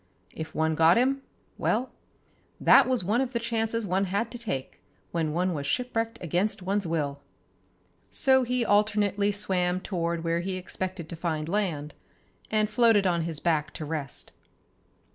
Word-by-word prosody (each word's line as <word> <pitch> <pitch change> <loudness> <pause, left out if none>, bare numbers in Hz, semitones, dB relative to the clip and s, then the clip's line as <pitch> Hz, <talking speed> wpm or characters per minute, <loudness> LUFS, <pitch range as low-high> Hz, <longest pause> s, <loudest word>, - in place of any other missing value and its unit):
If 160 0 -7
one 160 0 +1
got 165 +4 +5
him, 270 +3 +2 0.4
well, 255 - 0 0.7
that - - +6
was 255 -6 +2
one 215 +7 +1
of 260 -1 -2
the 235 - 0
chances 230 -1 -1
one 190 +1 +1
had 200 +5 -1
to 240 - -7
take 135 - -4 0.3
when 160 -3 -1
one 180 +3 0
was 145 -2 -4
shipwrecked 230 - -1
against 185 +4 0
one's 195 0 0
will. 145 -4 -2 0.9
So 265 -1 +3
he 250 -1 0
alternately 205 -1 +2
swam 185 -3 0
toward 170 -3 -2
where 165 0 0
he 185 +2 -3
expected 185 -1 -5
to - - -5
find 160 -2 -2
land, 165 -6 -1 0.6
and 215 -1 +2
floated 225 -2 +4
on 175 -2 +2
his 165 -3 -2
back 155 -3 0
to 155 - -5
rest. 150 -3 -2
185 Hz, 160 wpm, -27 LUFS, 165-225 Hz, 0.9 s, that